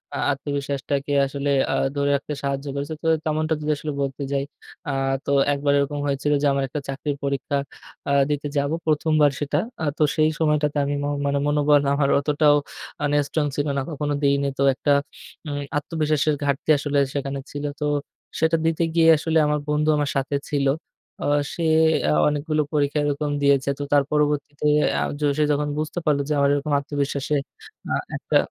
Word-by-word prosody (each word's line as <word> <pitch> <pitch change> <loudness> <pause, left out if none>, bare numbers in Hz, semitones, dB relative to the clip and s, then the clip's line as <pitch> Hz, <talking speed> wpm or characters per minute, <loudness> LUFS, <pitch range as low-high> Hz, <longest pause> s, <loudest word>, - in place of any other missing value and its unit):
আ - - -2
আত্মবিশ্বাসটাকে 140 0 -3
আসলে 140 +1 -3 0.2
আ - - +1 0.2
ধরে 140 0 +1
রাখতে 140 +2 -4
সাহায্য 140 0 -2
করেছে। 140 +3 -3
তো - - -1 0.2
তেমনটা 155 +1 0
যদি 150 0 0
আসলে 150 0 -4
বলতে 140 0 -3
যাই। 140 -1 0 0.4
আ 145 - -1 0.3
তো - - -1 0.2
একবার 140 0 0
এরকম 145 +1 -1
হয়েছিল 140 +1 0
যে, - - +1
আমার 140 0 0
একটা 140 +3 -4
চাকরির 140 +1 -3
পরীক্ষা 140 0 -1 0.5
আ - - +1 0.2
দিতে 145 0 -1
যাবো, 145 +3 +1
প্রথমবার 155 -1 +3
সেটা। 145 0 0 0.4
তো - - +3
সেই 155 0 +3
সময়টাতে 150 -2 +1
আমি 145 - -1
মন 145 0 -1
মানে 140 0 +1
মনোবল 145 0 +4
আমার 140 -1 +1
অতটাও 145 0 +3 0.5
মানে 145 0 +1
স্ট্রং 155 -2 0
ছিল 145 0 -1
না। - - +1
কখনো 145 -2 -2
দেইনি। 140 0 +2
তো - - -2
একটা 145 - 0 0.6
উম 145 0 -3 0.2
আত্মবিশ্বাসের 155 0 0
ঘাটতি 140 +1 -1
আসলে 145 0 0
সেখানে 140 -1 -3
ছিল। 145 0 -5 0.2
তো 150 - -1 0.5
সেটা 160 +1 +3
দিতে 165 +1 +1
গিয়ে 165 -1 +5
আসলে 160 +1 0
আমার 150 0 +1
বন্ধু 150 +1 +1
আমার 145 -1 0
সাথে 135 +1 -1
ছিল। 140 -2 0 0.6
আ - - -2 0.3
সে 170 - -4 0.5
আ - - +3 0.2
অনেকগুলো 150 +1 0
পরীক্ষা 145 0 +1
এরকম 145 0 -1
দিয়েছে। 140 -1 +3
তো 145 - -2
তার 145 -1 +5
পরবর্তীতে, 145 -1 0 0.3
আ - - 0 0.4
সে 155 - +3
যখন 145 0 0
বুঝতে 155 +3 -2
পারলো 145 -2 +2
যে, 150 - +2
আমার 140 0 +4
এরকম 145 +1 -1
আত্মবিশ্বাসে, 140 0 -2 0.6
আ - - +2 0.2
একটা - - +1
145 Hz, 175 wpm, -23 LUFS, 140-150 Hz, 0.6 s, গিয়ে